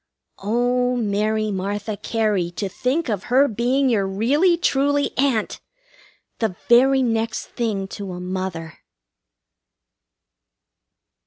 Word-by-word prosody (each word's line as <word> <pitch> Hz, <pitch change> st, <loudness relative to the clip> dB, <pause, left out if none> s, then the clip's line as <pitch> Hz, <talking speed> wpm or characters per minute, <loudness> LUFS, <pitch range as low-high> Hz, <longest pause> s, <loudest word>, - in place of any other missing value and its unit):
Oh, 245 Hz, +4 st, +1 dB
Mary 215 Hz, -1 st, 0 dB
Martha 205 Hz, +2 st, -3 dB
Cary, 210 Hz, -5 st, -1 dB
to 200 Hz, -, -2 dB
think 255 Hz, -, -1 dB
of 210 Hz, -4 st, -2 dB
her 265 Hz, +3 st, +4 dB
being 250 Hz, +4 st, +1 dB
your 210 Hz, -6 st, +1 dB
really, 280 Hz, -, +2 dB
truly 285 Hz, -3 st, +1 dB
Aunt! 255 Hz, -5 st, 0 dB, 0.8 s
The 220 Hz, -5 st, -1 dB
very 265 Hz, +3 st, +5 dB
next 225 Hz, -2 st, -1 dB
thing 210 Hz, -5 st, -2 dB
to 195 Hz, -2 st, -6 dB
a 180 Hz, -, -6 dB
mother! 180 Hz, -3 st, -5 dB
225 Hz, 105 wpm, -22 LUFS, 200-250 Hz, 0.8 s, very